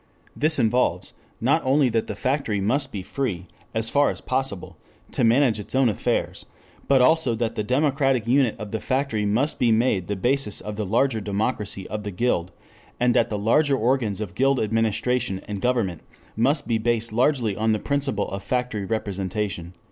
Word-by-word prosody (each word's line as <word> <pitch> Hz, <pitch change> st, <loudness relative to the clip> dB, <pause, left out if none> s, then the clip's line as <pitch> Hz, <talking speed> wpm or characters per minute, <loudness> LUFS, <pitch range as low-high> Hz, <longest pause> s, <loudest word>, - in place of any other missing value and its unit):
This 155 Hz, +2 st, +2 dB
involves, 120 Hz, +3 st, +1 dB, 0.3 s
not -, -, +2 dB
only 135 Hz, +1 st, +3 dB
that 115 Hz, -1 st, -1 dB
the 105 Hz, -, -4 dB
factory 130 Hz, -3 st, -1 dB
must 130 Hz, +8 st, 0 dB
be 95 Hz, -3 st, -5 dB
free, 110 Hz, -7 st, -3 dB, 0.3 s
as 110 Hz, 0 st, +2 dB
far 145 Hz, 0 st, +4 dB
as -, -, -5 dB
possible, 130 Hz, -7 st, -3 dB, 0.4 s
to -, -, -1 dB
manage 115 Hz, -1 st, +3 dB
its 105 Hz, -, -6 dB
own 130 Hz, -2 st, +4 dB
affairs, 105 Hz, -, -2 dB, 0.4 s
but 135 Hz, -2 st, +5 dB
also 160 Hz, -4 st, +3 dB
that 115 Hz, 0 st, -2 dB
the 110 Hz, -, -2 dB
democratic 135 Hz, -1 st, +1 dB
unit 125 Hz, -1 st, +2 dB
of 105 Hz, -2 st, -7 dB
the 110 Hz, -, -2 dB
factory 130 Hz, -6 st, -1 dB
must 125 Hz, +9 st, 0 dB
be 120 Hz, -2 st, +3 dB
made 110 Hz, -6 st, +1 dB
the 105 Hz, -, -2 dB
basis 120 Hz, +1 st, 0 dB
of 105 Hz, 0 st, -6 dB
the 105 Hz, -2 st, -3 dB
larger 115 Hz, +2 st, +1 dB
democracy 100 Hz, -1 st, -2 dB
of 105 Hz, -, -4 dB
the 105 Hz, -, -5 dB
Guild, 95 Hz, -3 st, -1 dB, 0.5 s
and 125 Hz, 0 st, +3 dB
that 115 Hz, -, +2 dB
the 105 Hz, -, -2 dB
larger 135 Hz, +7 st, +2 dB
organs 115 Hz, -4 st, 0 dB
of 105 Hz, -5 st, -5 dB
Guild 135 Hz, +4 st, +2 dB
administration 115 Hz, 0 st, 0 dB
and 100 Hz, -2 st, -5 dB
government 110 Hz, -9 st, 0 dB, 0.3 s
must 135 Hz, +6 st, +1 dB
be 115 Hz, -2 st, +1 dB
based 115 Hz, -1 st, -1 dB
largely 120 Hz, -4 st, +1 dB
on 110 Hz, +2 st, +1 dB
the 110 Hz, -, +2 dB
principle 135 Hz, -4 st, -1 dB
of 100 Hz, 0 st, -4 dB
factory 125 Hz, -4 st, -2 dB
representation." 95 Hz, -3 st, -3 dB
115 Hz, 180 wpm, -24 LUFS, 105-130 Hz, 0.5 s, but